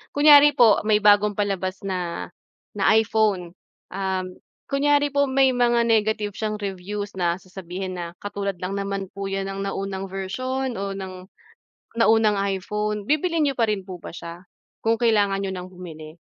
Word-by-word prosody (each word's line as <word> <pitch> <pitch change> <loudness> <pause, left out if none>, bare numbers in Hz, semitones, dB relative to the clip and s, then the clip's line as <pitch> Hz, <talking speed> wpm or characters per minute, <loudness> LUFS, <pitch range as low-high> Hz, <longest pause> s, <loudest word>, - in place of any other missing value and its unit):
Kunyari 290 0 +7
po 225 -6 +6
may 210 -1 +3
bagong 205 0 +5
palabas 195 -2 -2
na, 180 -3 -4 0.4
na 205 +1 +3
iPhone, 210 -5 +1 0.4
um, 190 -1 -2 0.5
kunyari 290 0 +2
po 280 0 +2
may 265 0 +3
mga 240 -1 +2
negative 220 -2 +1
siyang 215 +1 -3
reviews 200 +1 -5
na 170 -1 +1
sasabihin, 185 0 -7
na 170 - -3 0.2
"Katulad 200 -1 -3
lang 185 - -2
naman 195 -1 -4
po 195 0 -5
yan 195 0 -3
ng 195 0 -4
naunang 195 0 -4
version 255 +8 -3
o 195 0 -3
ng, 185 -1 -8 0.7
naunang 220 -1 +4
iPhone." 210 +2 -2
Bibilhin 310 - +1
n'yo 280 - +2
pa 230 -2 +2
rin 200 -3 -1
po 185 -2 -9
ba - - -9
siya 170 +1 -9 0.4
kung 225 0 +2
kailangan 210 -4 +2
niyo 190 - -3
ng 180 0 -6
bumili? 165 -3 -10
200 Hz, 160 wpm, -23 LUFS, 190-225 Hz, 0.7 s, Kunyari